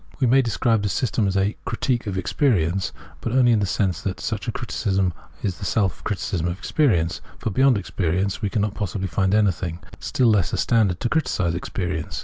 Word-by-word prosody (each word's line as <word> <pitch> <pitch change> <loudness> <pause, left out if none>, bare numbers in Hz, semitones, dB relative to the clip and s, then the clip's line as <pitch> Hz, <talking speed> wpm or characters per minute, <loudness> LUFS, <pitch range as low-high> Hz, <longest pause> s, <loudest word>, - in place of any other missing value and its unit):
i - - -20
We - - +5
may 130 +3 +5
describe 115 -2 +1
this 105 -1 -1
system 115 -4 +1
as 95 0 0
a 100 +2 +1
" - - -34
critique 120 -4 -1
of 95 -2 -2
ex 95 - -3
perience," 95 - +2 0.3
but 115 - -3
only 125 -2 +5
in 110 - +4
the 100 - 0
sense 95 -2 0
that 95 -2 -3
such - - -3
a - - +1
criticism 95 -3 -1 0.3
is 95 -4 -2
the - - -7
self 95 -1 0
criticism 95 -4 -2
of 85 +1 -2
experience; 85 - +1 0.2
for 110 - -3
beyond 130 +2 +4
experience 95 +1 -1
we 105 - 0
cannot 105 -1 0
possibly 100 -2 -3
find 95 +2 +1
anything, 90 -5 +1 0.2
still 125 -3 +2
less 100 -7 +2
a - - +1
standard 105 -7 +2
to 120 - 0
criticise 110 - 0
experience. 85 -1 -3
100 Hz, 210 wpm, -23 LUFS, 90-115 Hz, 0.3 s, We